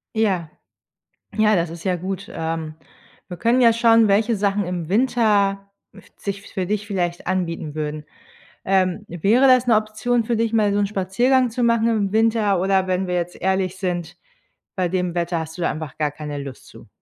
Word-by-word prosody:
Ja. 190 -7 0 0.9
Ja, 215 0 +4
das 170 -2 0
ist 170 +2 -10
ja 185 -1 +1
gut, 190 +2 -5
ähm, 160 -1 -4 0.5
wir 180 - -7
können 240 +6 +2
ja 235 -2 +7
schauen, 230 -2 +4
welche 220 +3 +2
Sachen 200 -1 0
im 175 -3 -4
Winter 200 -3 +1 0.2
f - - -16
sich 200 -1 -5
für 185 -2 -2
dich 210 +2 -2
vielleicht 175 -4 -2
anbieten 170 -5 -2
würden. 150 0 -4 0.6
Ähm, 190 +1 +1
wäre 210 +11 +3
das 255 -1 +5
'ne 235 - +4
Option 215 +3 0
für 235 +1 -1
dich 225 0 0
mal 215 -3 +2
so 205 - +1
'n 205 - +2
Spaziergang 240 +7 +1
zu 240 +2 -1
machen 230 -1 +3
im 210 -4 0
Winter, 220 -4 +2
oder 190 0 +2
wenn 185 0 -1
wir 180 - -1
jetzt 175 0 -2
ehrlich 190 -1 0
sind, 175 -3 -4 0.6
bei 185 -2 0
dem 180 -1 -2
Wetter 170 -1 -1
hast 160 +2 -8
du 175 - -4
da - - +1
einfach 155 -3 -8
gar 150 -2 0
keine 150 -1 -6
Lust 140 -2 -8
zu? - - -15
195 Hz, 190 wpm, -21 LUFS, 175-220 Hz, 0.9 s, ja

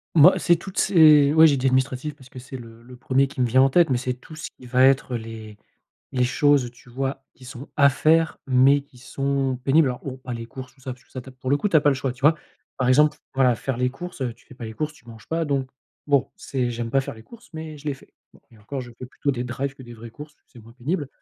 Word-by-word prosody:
Moi, 165 +4 +7
c'est 175 -1 +3
toutes 190 +3 -10
ces 150 -5 +6
ouais, 160 0 +8
j'ai 145 - +3
dit: 135 0 0
«Administratif», 130 +3 0
parce 130 -3 -17
que - - -13
c'est 130 +1 -9
le 115 -1 -13
le 125 +1 -13
1er 135 +2 +1
qui 135 - -11
me 125 - +3
vient 130 +3 +4
en 135 - +5
tête, 170 +1 +4
mais 125 - +2
c'est 125 +1 -2
tout 130 +5 -14
ce 155 - -7
qui 125 - -13
va 125 +1 +2
être 135 -2 +3
les 110 -2 -8 0.6
les 125 - +1
choses 135 -1 +2
tu 120 0 -19
vois, 135 +1 -4
qui 130 - -17
sont 125 +2 -9
à 140 -1 +6
faire, 160 +4 +2
mais 135 +2 +4
qui 135 -3 -21
sont 135 0 -2
pénibles. 140 +1 +4
Alors, 125 - -4
bon, 130 -2 -6
pas 130 -1 -7
les 115 -1 -6
courses, 130 +1 -10
tout 135 - -26
ça, 130 0 -5
parce 125 0 -15
que - - -32
ça, 130 - -6
tu 130 - -14
as, - - -11
pour 130 0 -6
le 145 - +4
coup, 205 - -1
tu 165 - +3
as - - +6
pas 145 - +2
le 140 - +4
choix, 130 -2 -2
tu 130 - -18
vois? 150 +3 +4 0.4
Par 130 - -1
exemple, 150 +3 +4 0.2
voilà, 130 -2 +4
faire 135 0 -3
les 125 0 +1
courses, 175 +3 -9
heu, 125 -3 -2
tu 115 - -24
fais - - -14
pas 120 -2 -9
les 110 - -8
courses, 155 +3 -3
tu 120 -5 -21
manges 115 -2 -13
pas, 165 0 -1
donc 140 -3 -1 0.4
bon, 140 -2 +2
c'est 125 -3 -2
j'aime 115 -1 -4
pas 135 - +3
faire 135 - -6
les 110 - -14
courses, 235 0 -16
mais 160 -1 -7
je 150 - -14
les 145 - -1
fais. - - -20 0.2
Bon, - - -21
et 110 - -18
encore, 130 +6 -6
je 120 -1 -9
fais 125 - -8
plutôt 140 +2 -2
des 125 -1 -3
drives 135 +3 -4
que 135 - -13
des 120 -1 -11
vraies 115 +1 -11
courses, 150 +5 -11
c'est 120 - -16
moins 115 +1 -16
pénible, 145 +4 -3
130 Hz, 290 wpm, -23 LUFS, 125-145 Hz, 0.6 s, ouais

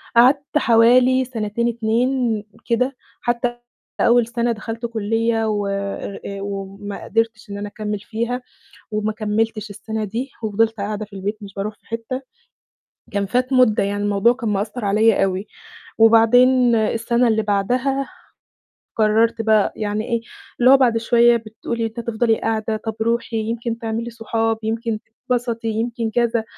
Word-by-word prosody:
قعدت 275 +5 +4
حوالي 250 +2 +5
سَنتين 235 -1 -2
2 235 0 0 0.2
كده، 250 +3 0 0.3
حتى 240 0 -1 0.4
أول 235 -1 +4
سَنة 235 0 0
دخلت 230 +1 -5
كُلّية 225 0 0
و 205 -1 -1
أر 200 0 -4
آآ 200 0 -5
وما 200 0 -6
قدرتش 225 -1 -1
إن 200 - -5
أنا 205 0 -4
أكمّل 210 0 -4
فيها 235 +3 -3 0.5
وما 215 0 -1
كمّلتش 215 0 -2
السَنة 215 +2 -4
دي 235 +7 -4
وفضلت 220 +1 +1
قاعدة 210 +1 -3
في 210 - -20
البيت 205 +3 -3
مش 200 -1 -10
باروح 205 +2 -3
في - - -35
حتة، 230 +3 -4 0.9
كان 200 0 0
فات 250 +6 0
مُدة، 250 -5 +4
يعني 205 +1 -2
الموضوع 205 +3 +3
كان 240 -3 -4
مأثّر 210 +4 -2
عليّا 210 +1 +3
أوي. 190 +1 -2 0.5
وبعدين 240 +2 +6
السَنة 230 +2 +1
اللي 220 -1 +2
بعدها 250 +7 0 0.9
قررت 225 +1 +3
بقى 220 -2 +3
يعني 210 0 -2
إيه، 235 -1 0 0.4
اللي 250 +1 +6
هو 270 - +9
بعد 245 -4 +3
شوية 235 +1 +4
بتقول 230 +1 -6
لي 230 - 0
أنتِ 225 +1 -8
هتفضلي 230 0 +1
قاعدة؟ 220 0 -1
طَب 220 0 -5
روحي 230 0 -1
يمكن 230 +1 -3
تعملي 230 0 -3
صحاب، 225 -1 -1
يمكن 225 0 -2 0.3
تتبسطي، 235 -2 -1
يمكن 225 +1 -2
كذا، 235 -1 +1
225 Hz, 150 wpm, -21 LUFS, 215-235 Hz, 0.9 s, هو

